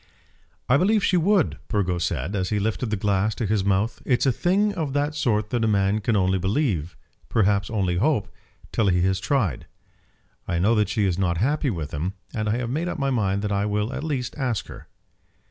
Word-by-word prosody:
"I 130 - +5
believe 205 +6 +2
she 185 - +2
would," 180 +1 +2
Burgo 95 -5 0
said, 85 +3 -2
as 95 -2 -1
he 105 - 0
lifted 110 +2 -1
the 105 - 0
glass 100 +1 0
to 115 - -2
his 105 -1 +1
mouth. 100 +4 0
"It's 125 +1 +1
a 135 - +4
thing 195 - +1
of 160 -7 -3
that 145 +1 0
sort 115 -8 0
that 120 -2 0
a - - +3
man 100 0 +2
can 110 +2 +1
only 95 -1 +2
believe, 95 - -1 0.3
perhaps 100 -3 +2
only 95 -5 0
hope, 120 - +1 0.4
till 110 - +1
he 90 -2 +2
has 95 0 +1
tried. 100 - -1 0.8
I 85 - -1
know 100 +7 +3
that 105 -3 +2
she 105 -1 +1
is 95 -1 0
not 85 -3 +1
happy 140 - +1
with 80 -8 -4
him, 85 +6 -2 0.2
and 110 -3 -1
I 110 - +1
have 120 -1 -3
made 160 +6 -1
up 175 - -3
my 140 -2 0
mind 100 -5 0
that 105 - -1
I 100 +1 0
will 105 +4 -1
at - - -4
least 135 -6 -3
ask 125 -6 -1
her." - - -11
105 Hz, 215 wpm, -24 LUFS, 95-135 Hz, 0.8 s, I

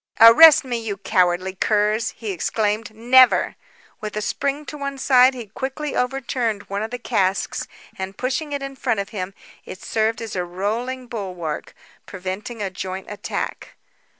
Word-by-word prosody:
"Arrest 300 +7 +9
me, 240 -2 -2
you 215 -3 -4
cowardly 185 -1 +1
curs!" 210 +3 +1
he 220 -3 -4
exclaimed. 215 +4 -1
"Never!" 250 +3 +5 0.4
With 215 -1 -5
a - - -1
spring 280 +5 -2
to 300 - -7
one 280 -1 -4
side, 260 -1 +5
he 240 -2 -6
quickly 265 +7 -5
overturned 250 -4 -1
one 200 +1 -4
of 220 - -3
the 245 - -4
casks 200 -5 -1 0.3
and 190 +1 -5
pushing 270 +4 -2
it 285 -1 -3
in 275 0 -6
front 225 -4 -1
of 200 - -3
him, 195 -3 -5 0.3
it 185 - -10
served 220 0 0
as 225 -3 -6
a 180 - 0
rolling 220 +9 -3
bulwark, 185 -9 -5 0.3
preventing 195 +4 -5
a 195 - -3
joint 185 0 -5
attack. 205 - -5
220 Hz, 160 wpm, -22 LUFS, 195-255 Hz, 0.4 s, Arrest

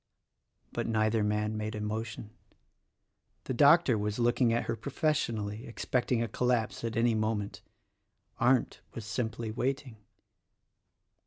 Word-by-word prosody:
But - - -2
neither 110 -1 +2
man 105 +1 0
made 110 0 -3
a - - -4
motion. 110 0 -4 1.1
The - - -3
Doctor 140 -2 +5
was 105 0 -2
looking 120 0 +3
at 115 - +1
her - - -2
professionally, 120 -7 -1
expecting 120 0 0
a - - -2
collapse 120 -2 0
at 115 -1 -2
any 115 0 +3
moment. 110 -2 -1 0.8
Arndt 125 0 +2
was 115 - -6
simply 115 0 -3
waiting. 130 0 -2
115 Hz, 125 wpm, -30 LUFS, 110-125 Hz, 1.1 s, Doctor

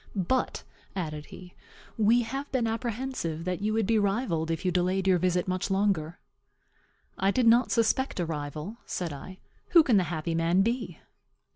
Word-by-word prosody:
"But," 205 +7 0 0.3
added 155 -5 -4
he, 180 -1 -12 0.4
"we 230 +3 +4
have 270 +5 -5
been 255 -3 +1
apprehensive 225 -7 -3
that 180 +1 -2
you 210 +1 0
would 220 -1 +1
be 225 +1 +3
rivalled 195 -6 0
if 165 +3 -2
you 180 - +2
delayed 185 +2 +1
your 185 -2 +4
visit 180 0 +1
much 185 +2 -1
longer." 190 -5 0 1.0
"I 195 - +3
did 250 +4 +2
not 235 +2 +5
suspect 230 +1 +1
a 175 - +1
rival," 150 +6 -5
said 170 -4 -3
I. 185 +7 -9 0.4
"Who 335 -3 +9
can 240 -8 +3
the 185 - +2
happy 165 0 -3
man 165 +3 +3
be?" 235 +3 -2
190 Hz, 170 wpm, -28 LUFS, 170-230 Hz, 1.0 s, Who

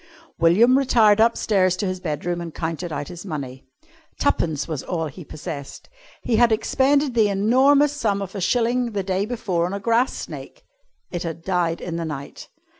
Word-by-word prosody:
William 220 +11 +5
retired 220 -6 +4
upstairs 200 -5 +2
to 200 - -2
his 185 -1 -2
bedroom 175 +1 -3
and 165 -2 -7
counted 165 +1 -4
out 145 -1 -4
his 175 -1 -8
money 135 -8 -6 0.5
twopence 160 - 0
was 155 -5 -3
all 165 -3 -3
he 155 +4 -8
possessed. 145 - -8 0.3
He 230 -3 +1
had 240 0 +5
expended 270 +5 +2
the 220 -3 +3
enormous 265 +9 +4
sum 215 -8 0
of 195 -1 -6
a 200 - -5
shilling 240 +3 +1
the 200 -2 -1
day 190 +2 -1
before 195 -8 -1
on 185 - -5
a - - -4
grass 230 +4 +1
snake. - - -9 0.5
It 175 - -3
had 165 -1 -5
died 175 -3 0
in 170 -1 -4
the 165 - -3
night. 145 -3 -7
190 Hz, 180 wpm, -22 LUFS, 165-230 Hz, 0.5 s, William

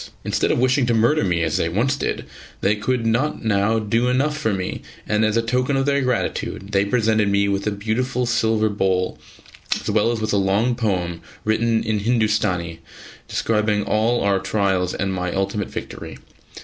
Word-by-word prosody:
Instead - - 0
of - - +2
wishing 130 +1 +2
to 120 - +2
murder 115 +6 +3
me, 85 -3 +1
as 80 -2 0
they 80 - 0
once 120 +10 +1
did, 140 - -3 0.4
they 100 +2 +2
could 115 +3 -1
not 120 +4 0
now 105 +1 +2
do 115 +3 +1
enough 135 +4 +1
for 145 -8 -1
me, 95 -2 -3 0.3
and 105 0 +2
as 110 +1 +2
a 115 - +2
token 125 +4 0
of 135 - +1
their 140 0 +2
gratitude 120 -5 -2
they 100 -1 +3
presented 110 -1 +2
me 100 0 +2
with 100 +1 -1
a - - +1
beautiful 115 +5 -1
silver 110 -2 +2
bowl, 95 -3 0 0.6
as - - -3
well 110 +2 +2
as 115 - -2
with 110 -1 -1
a - - +3
long 100 +5 +2
poem 90 -8 -2 0.2
written 110 +1 +1
in 110 -1 0
Hindustani 105 -7 0 0.5
describing 105 -2 0
all 110 +3 +1
our 100 -1 +2
trials 95 -2 0
and 95 0 -1
my 90 -1 -2
ultimate 100 +1 -2
victory. - - -7
110 Hz, 185 wpm, -21 LUFS, 100-120 Hz, 0.6 s, murder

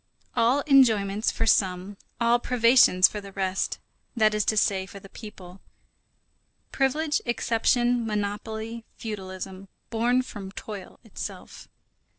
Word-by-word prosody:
All 245 +4 +3
enjoyments 220 -7 +4
for 225 - -2
some, 190 -2 +1 0.2
all 235 0 +3
privations 235 -7 +5
for 210 - -6
the 200 0 -11
rest, 190 -1 -1 0.4
that 215 -2 +3
is 210 0 +1
to 215 - +1
say, 190 -2 +1
for 200 - -11
the 195 - -14
people; 190 -4 -11 1.1
privilege, 295 +3 0
exception, 240 0 +1
monopoly, 220 +2 -4
feudalism, 190 -2 -7 0.2
born 245 +3 +2
from 200 -6 -8
toil 200 -3 -9
itself. 225 - -8
215 Hz, 120 wpm, -26 LUFS, 195-240 Hz, 1.1 s, privations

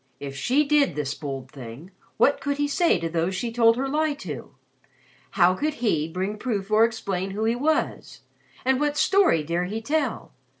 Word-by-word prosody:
If 140 -1 -7
she 250 - +2
did 285 - +2
this 145 -2 -2
bold 135 -3 -6
thing, 135 +7 -10 0.3
what 285 - +3
could 285 -1 -1
he 290 0 +1
say 340 +4 +2
to 165 -1 -3
those 170 +3 -1
she 230 +4 -3
told 230 0 +4
her 270 +2 -1
lie 300 +1 0
to? 285 - -8 0.8
How 175 +1 +5
could 300 +10 -2
he 165 -10 0
bring 190 +5 -4
proof 210 -5 -3
or 215 +1 +5
explain 195 -5 -3
who 205 +3 -3
he 230 +1 +2
was 305 +5 -1 0.4
and 260 0 +2
what 295 0 0
story 380 - +3
dare 170 +3 -1
he 210 +5 -4
tell? 285 +2 -2
220 Hz, 185 wpm, -25 LUFS, 170-285 Hz, 0.8 s, How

